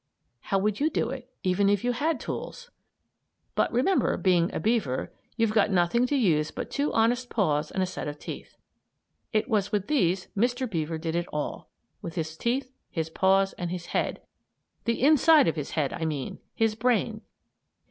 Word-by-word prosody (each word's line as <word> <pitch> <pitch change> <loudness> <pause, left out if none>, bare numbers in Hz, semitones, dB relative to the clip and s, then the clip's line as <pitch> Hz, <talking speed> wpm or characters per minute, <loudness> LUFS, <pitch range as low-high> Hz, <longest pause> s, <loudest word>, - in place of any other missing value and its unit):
How 195 - -1
would 205 +1 0
you 300 +2 +2
do 240 -5 -1
it; 260 -1 -7
even 190 +2 +2
if 205 -1 +2
you 245 - +2
had 290 +3 0
tools? 485 0 -6 0.8
But - - +1
remember, 265 +11 +2
being 175 -2 +2
a - - -3
beaver, 210 - 0 0.2
you've 225 -2 +2
got 215 -1 +4
nothing 190 +6 +2
to 285 - 0
use 160 - +2
but - - -6
two 285 +1 0
honest 245 +2 +2
paws 150 -8 +1
and 190 - -1
a - - +2
set 180 -4 -5
of 145 0 -5
teeth. - - -8 0.7
It 215 +1 +1
was 210 -5 +1
with 205 -3 0
these 185 - +1
Mr. 245 +4 +1
Beaver 165 -5 -2
did 160 0 -3
it 175 0 -1
all 150 -1 -4 0.3
with 165 - -6
his 160 -1 -3
teeth, 255 +7 -1 0.2
his 160 -2 -3
paws, 195 +2 +3
and 175 -1 -2
his 175 -1 -5
head; - - -1 0.6
the 230 +1 0
inside 310 - +6
of 160 - +1
his 150 -3 -5
head, 145 -3 +1
I 165 - -3
mean 145 -5 -3 0.2
his 225 -1 +2
brain. 225 -1 0
205 Hz, 185 wpm, -27 LUFS, 170-245 Hz, 0.8 s, inside